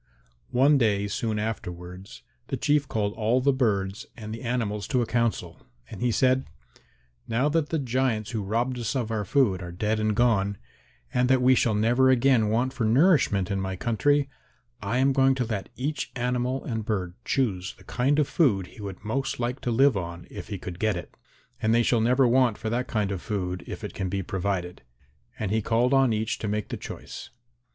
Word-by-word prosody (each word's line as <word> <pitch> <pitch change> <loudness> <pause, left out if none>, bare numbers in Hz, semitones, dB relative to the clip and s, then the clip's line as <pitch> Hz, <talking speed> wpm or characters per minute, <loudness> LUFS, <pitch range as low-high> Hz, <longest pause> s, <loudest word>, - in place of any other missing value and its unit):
One 140 +3 +4
day 100 -4 +2
soon 110 +2 -2
afterwards 95 +1 -6 0.2
the 135 - -2
Chief 145 +2 +2
called 105 -3 -1
all 115 +4 +1
the 140 +2 +3
birds 100 -6 -1
and 110 -2 -7
the 115 - -7
animals 115 -4 -2
to 125 -3 +1
a - - -2
council, 115 -7 -1 0.3
and 105 - -8
he 125 - +2
said, 130 +2 +2 0.8
"Now 125 +5 +1
that 155 -1 0
the 165 - 0
giants 125 -5 -1
who 110 -3 -2
robbed 120 +5 -1
us 120 +3 -2
of 120 -4 -1
our 110 -2 -1
food 100 -5 +2
are 90 -1 -6
dead 105 +5 -1
and 110 -1 +1
gone, 100 -4 +2 0.6
and 125 0 +2
that 130 0 +5
we 130 +1 +6
shall 115 -3 +2
never 120 +5 +3
again 125 -4 +4
want 125 +4 +1
for 125 - -2
nourishment 115 - +3
in 100 -1 -1
my 95 0 -3
country, 140 +8 +1 0.5
I 105 +4 -1
am 135 +1 +3
going 135 0 +4
to 125 -1 -1
let 105 -4 -4
each 140 +1 -3
animal 125 +1 -1
and 115 -3 -3
bird 95 -5 -2
choose 100 -8 -1
the - - -18
kind 135 +4 +1
of 150 -3 +3
food 105 - +2
he 105 - -13
would 100 -2 -7
most 135 +5 -2
like 125 +2 -2
to - - -2
live 130 +2 +4
on 85 -2 -5
if - - -8
he - - -4
could 90 -1 -8
get 110 -2 +1
it. 90 - -7 0.5
And 110 +1 +3
they 120 - +4
shall 115 -1 +2
never 125 +3 +4
want 120 -2 +3
for 110 - -4
that 125 +2 -1
kind 105 -3 -1
of 95 -3 -3
food 90 -3 -3
if - - -7
it - - -5
can 95 -2 -3
be 95 +1 -2
provided." 90 -1 -3 0.6
And 105 -3 -3
he 110 +1 +1
called 120 +5 +2
on 135 -2 +4
each 110 +1 -1
to 110 - -3
make 105 0 -2
the - - -4
choice. - - -8
115 Hz, 205 wpm, -26 LUFS, 100-130 Hz, 0.8 s, we